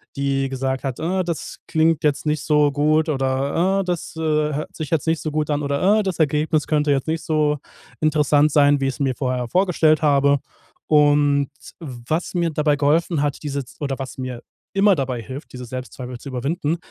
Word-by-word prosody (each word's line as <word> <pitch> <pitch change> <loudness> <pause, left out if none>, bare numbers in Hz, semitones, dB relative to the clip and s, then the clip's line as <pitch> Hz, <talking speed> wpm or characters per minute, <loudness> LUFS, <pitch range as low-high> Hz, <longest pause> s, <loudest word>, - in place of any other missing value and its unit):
die 135 -1 0
gesagt 130 0 -2
hat: 135 0 -3
Ah, 185 +4 0
das 170 -2 -5
klingt 160 0 +2
jetzt 150 0 +1
nicht 150 -1 0
so 150 -1 +3
gut“ 155 +3 +2
oder 135 -3 0 0.3
„Ah, 190 +3 +2
das, 175 -3 -4
äh, 160 - -5
hört 150 -1 -1
sich 155 -4 -5
jetzt 160 -3 0
nicht 160 -1 0
so 155 - -3
gut 155 0 -1
an“ 145 0 0
oder 140 -1 -1
„Ah, 210 +3 +4
das 190 -3 -2
Ergebnis 155 0 +1
könnte 150 -1 +1
jetzt 135 0 0
nicht 160 0 -2
so 150 -2 +1 0.4
interessant 150 -1 +3
sein, 145 -1 +4
wie 135 - +1
ich's 135 - -4
mir 135 -2 +1
vorher 125 -3 -2
vorgestellt 165 -1 +2
habe.“ 140 -1 +3 0.5
Und 145 -2 +3 0.3
w 130 -8 -8
was 165 +4 -1
mir 170 -2 +1
dabei 150 -1 +1
geholfen 155 +2 +2
hat 145 0 -2
dieses 140 -3 -5
oder 140 -2 -3
was 130 - -6
mir 130 -2 -5 0.3
immer 195 0 +4
dabei 130 -5 -2
hilft, 135 +6 -9
diese 125 -1 -7
Selbstzweifel 125 0 -7
zu 140 - -9
überwinden, 145 +5 -2
150 Hz, 195 wpm, -21 LUFS, 135-160 Hz, 0.5 s, Ah